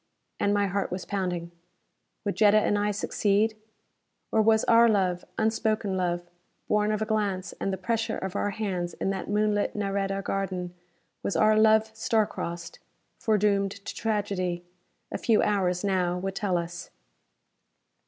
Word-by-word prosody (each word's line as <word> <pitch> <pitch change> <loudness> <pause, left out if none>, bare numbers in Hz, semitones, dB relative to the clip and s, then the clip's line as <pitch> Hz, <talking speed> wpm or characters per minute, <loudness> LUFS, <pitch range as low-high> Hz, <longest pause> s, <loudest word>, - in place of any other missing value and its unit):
And 200 - +2
my 205 0 +2
heart 200 +1 -1
was 180 -1 -4
pounding. 180 -3 -3 0.7
Would 200 - -1
Jetta 210 +1 +5
and 210 -1 +2
I 205 0 +1
succeed? 210 +1 +1 0.8
Or 220 - +4
was 220 0 +4
our 230 0 +6
love 185 -4 +1
unspoken 220 -2 0
love, 175 -1 -1 0.4
born 210 0 +2
of 215 0 0
a - - -2
glance 205 -4 -1
and 195 - -1
the 190 - -2
pressure 225 +4 -1
of 190 0 -5
our 205 - 0
hands 190 -4 -3
in 195 - -1
that 190 -1 -4
moonlit 210 0 +1
Nareda 195 -1 -1
garden 185 -3 -3 0.5
was - - -2
our 215 0 +4
love 220 0 +4
star 220 -1 +2
crossed, 170 -3 -6 0.4
foredoomed 200 -2 +2
to - - -5
tragedy? 195 -5 -2 0.5
A - - -3
few 225 -3 +3
hours, 185 -3 +1
now, 180 -3 +1
would 195 +1 -3
tell 190 -2 0
us. 170 0 -5
200 Hz, 155 wpm, -27 LUFS, 185-215 Hz, 0.8 s, our